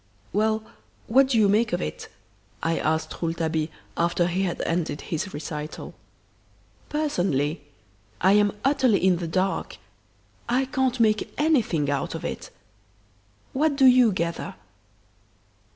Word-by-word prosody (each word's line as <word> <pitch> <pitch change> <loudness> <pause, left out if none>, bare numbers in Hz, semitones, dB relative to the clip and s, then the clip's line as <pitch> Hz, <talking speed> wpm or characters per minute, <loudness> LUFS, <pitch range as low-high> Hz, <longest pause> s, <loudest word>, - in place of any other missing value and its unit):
"Well, 220 +2 +1 0.4
what 265 +4 +4
do 255 -3 +1
you 215 -2 +5
make 215 +3 +2
of - - +1
it?" 75 0 -5 0.6
I 165 0 +1
asked 160 +1 -1
Rouletabille, 165 -2 -1 0.3
after 170 +1 +1
he 180 +2 -1
had 185 -3 -2
ended 165 -3 -1
his 175 +4 -4
recital. 150 +1 -6 1.0
"Personally 175 - 0 0.6
I 190 - +4
am 205 0 +3
utterly 265 -8 +3
in 185 -2 +4
the 170 -1 -4
dark. 185 +3 -1 0.7
I 255 +3 +2
can't 260 -1 0
make 215 -2 +2
anything 230 - +2
out 140 -1 -2
of - - -6
it. - - -5 1.0
What 295 +2 +2
do 275 -1 +4
you 250 -3 +7
gather?" 170 -3 -3
195 Hz, 130 wpm, -25 LUFS, 165-245 Hz, 1.0 s, you